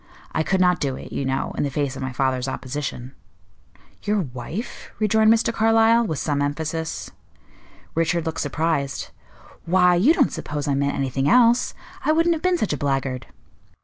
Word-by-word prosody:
I - - 0
could 190 +4 0
not 180 -1 +3
do 135 -2 -1
it, - - -10
you 140 - -2
know, 130 0 -2
in - - -1
the 145 - 0
face 140 0 -2
of - - -7
my 130 0 -3
father's 130 0 0
opposition." 130 -1 -5 0.9
"Your 210 -1 0
wife?" 155 - -6
rejoined 220 +1 +4
Mr. 230 0 +2
Carlyle, 225 +1 +4
with 160 - -2
some 145 0 -1
emphasis. 160 +2 -3 0.8
Richard 165 +1 0
looked 160 - -2
surprised. 145 -1 -1 0.5
"Why, 180 +1 +4
you 225 - +4
don't 275 - +2
suppose 150 0 -4
I 140 - +1
meant 140 +1 0
anything 135 +1 0
else! 240 +2 +4 0.3
I 310 - +3
wouldn't 330 +2 +3
have 320 - -4
been 365 -1 +2
such 215 - -1
a - - -2
blackguard." 135 -2 -2
160 Hz, 175 wpm, -23 LUFS, 135-215 Hz, 0.9 s, rejoined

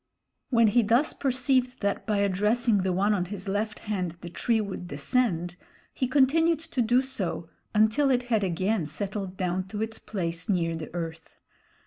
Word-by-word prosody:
When 230 -3 +5
he 240 +4 +4
thus 235 +7 +2
perceived 255 -1 0
that 200 -1 -1
by 210 -2 +1
addressing 210 +3 +2
the 185 0 0
one 200 +4 +2
on 180 -3 0
his 195 +1 -7
left 205 +2 -1
hand 180 -5 -3
the 175 - -7
tree 225 +6 +1
would 200 -4 -4
descend, 175 - -1 0.4
he 255 - -1
continued 300 +5 +3
to 320 -6 -2
do 240 +3 +3
so 195 -10 -3 0.3
until 220 +7 +4
it 250 -2 +2
had 225 -4 +1
again 185 0 0
settled 195 +2 -4
down 185 0 -1
to 205 +1 -6
its 225 0 -4
place 170 -3 -4
near 165 -4 +1
the 160 -1 -7
earth. 165 -1 -6
205 Hz, 170 wpm, -27 LUFS, 180-245 Hz, 0.4 s, When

